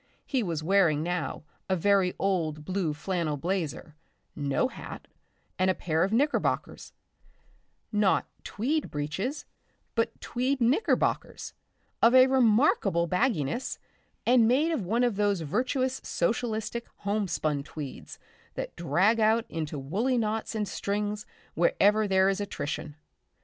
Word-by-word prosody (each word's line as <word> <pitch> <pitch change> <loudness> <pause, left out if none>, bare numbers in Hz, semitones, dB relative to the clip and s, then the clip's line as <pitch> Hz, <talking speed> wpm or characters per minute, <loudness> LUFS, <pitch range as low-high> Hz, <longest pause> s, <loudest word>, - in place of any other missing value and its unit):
He 265 -3 0
was 165 -7 -2
wearing 165 -4 +3
now 175 -2 -3 0.3
a 190 - +3
very 190 0 +2
old 160 -6 -1
blue 185 -3 -1
flannel 155 0 -2
blazer, 165 -2 -3 0.4
no 145 - 0
hat, - - -9 0.5
and 185 0 +3
a 185 - +2
pair 160 -1 0
of 195 - 0
knickerbockers, 280 +6 0 1.0
not 210 -3 +2 0.2
tweed 280 +9 -1
breeches 165 - -3 0.5
but 230 -1 -1
tweed 255 +3 -1
knickerbockers 260 - 0 0.5
of 235 +2 +6
a 255 0 +9
remarkable 225 - +3
bagginess, 185 - 0 0.5
and 240 -2 +5
made 285 +8 +3
of 230 - -2
one 235 +5 +2
of 240 -5 +1
those 205 -3 +1
virtuous 255 - -1
socialistic 225 +4 -2
homespun 190 -8 -1
tweeds 145 -2 -8 0.4
that - - -5
drag 180 +8 +2
out 220 +1 +3
into 155 -2 -4
woolly 205 - 0
knots 220 0 -1
and 210 -1 -1
strings 205 +2 -3 0.3
wherever 205 +5 +3
there 190 -1 +4
is 195 +1 0
attrition. 150 -6 -4
200 Hz, 125 wpm, -28 LUFS, 165-235 Hz, 1.0 s, a